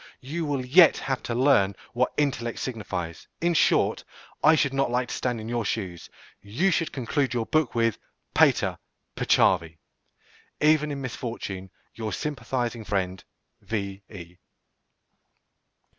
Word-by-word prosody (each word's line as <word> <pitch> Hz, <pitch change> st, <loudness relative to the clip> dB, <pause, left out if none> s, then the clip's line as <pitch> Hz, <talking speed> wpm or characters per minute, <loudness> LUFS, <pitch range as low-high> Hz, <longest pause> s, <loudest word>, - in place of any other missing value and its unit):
You 155 Hz, +6 st, -3 dB
will 140 Hz, -3 st, -2 dB
yet 165 Hz, +6 st, +7 dB
have 130 Hz, -1 st, -2 dB
to 115 Hz, -, -1 dB
learn 120 Hz, -7 st, +3 dB, 0.2 s
what 125 Hz, +1 st, +1 dB
"intellect" 135 Hz, -5 st, 0 dB
signifies. 90 Hz, -8 st, -5 dB
In 170 Hz, +1 st, +1 dB
short, -, -, +3 dB, 0.4 s
I 155 Hz, +1 st, +7 dB
should 140 Hz, -3 st, +1 dB
not 135 Hz, -1 st, +1 dB
like 125 Hz, 0 st, 0 dB
to -, -, -4 dB
stand 125 Hz, -2 st, -2 dB
in 110 Hz, -, -7 dB
your 120 Hz, 0 st, -1 dB
shoes. 95 Hz, -5 st, -4 dB, 0.3 s
You 120 Hz, -, 0 dB
should 165 Hz, 0 st, 0 dB
conclude 130 Hz, +1 st, -1 dB
your 115 Hz, -2 st, 0 dB
book 155 Hz, -3 st, +1 dB
with 115 Hz, -2 st, +1 dB, 0.3 s
"Pater, -, -, +3 dB, 0.4 s
peccavi." 85 Hz, -3 st, +2 dB, 0.8 s
Even 150 Hz, 0 st, +3 dB
in 140 Hz, -1 st, -4 dB
misfortune, 115 Hz, -6 st, -5 dB, 0.2 s
Your 110 Hz, -2 st, -4 dB
sympathizing 125 Hz, -5 st, -3 dB
friend, 95 Hz, -3 st, -2 dB, 0.4 s
_V.E. 100 Hz, -4 st, -6 dB
120 Hz, 130 wpm, -26 LUFS, 100-140 Hz, 0.8 s, yet